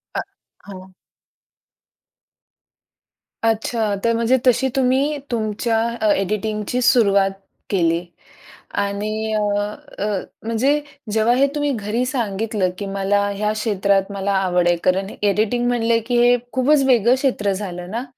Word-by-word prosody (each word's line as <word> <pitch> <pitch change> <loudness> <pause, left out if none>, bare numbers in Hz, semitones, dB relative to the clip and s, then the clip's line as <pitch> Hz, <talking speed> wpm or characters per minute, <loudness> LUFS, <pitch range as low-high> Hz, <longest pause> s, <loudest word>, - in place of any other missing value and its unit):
अ - - 0 0.5
हो. 190 -1 -10 2.5
अच्छा. 225 -1 0
तर 230 0 +2
म्हणजे 235 +3 +2
तशी 255 +2 +4
तुम्ही 270 +3 +2
तुमच्या 225 0 -1 0.2
अ, 215 - +3
एडिटिंगची 215 +4 -2
सुरुवात 200 -5 +4 0.4
केली 170 -2 +1 0.8
आणि 215 +2 -2
अ, 215 - +1 0.6
अ, - - 0 0.4
म्हणजे 255 +6 +1 0.3
जेव्हा 225 +2 +3
हे 275 +2 +4
तुम्ही 290 -1 0
घरी 220 +3 -2
सांगितलं, 215 -5 -1
की 200 - -5
मला 200 +1 0
ह्या 210 +1 -1
क्षेत्रात 200 -2 0
मला 200 0 -1
आवड 180 -2 +1
आहे. 175 - +4
कारण 190 +2 +1
एडिटिंग 215 +4 +1
म्हणलं, 235 -1 +2
की 245 -1 +1
हे 245 0 +5 0.2
खूपच 275 +2 +3
वेगळं 240 0 +4
क्षेत्र 245 -7 0
झालं 180 -2 -6
ना? 235 +3 -3
215 Hz, 125 wpm, -20 LUFS, 200-240 Hz, 2.5 s, हे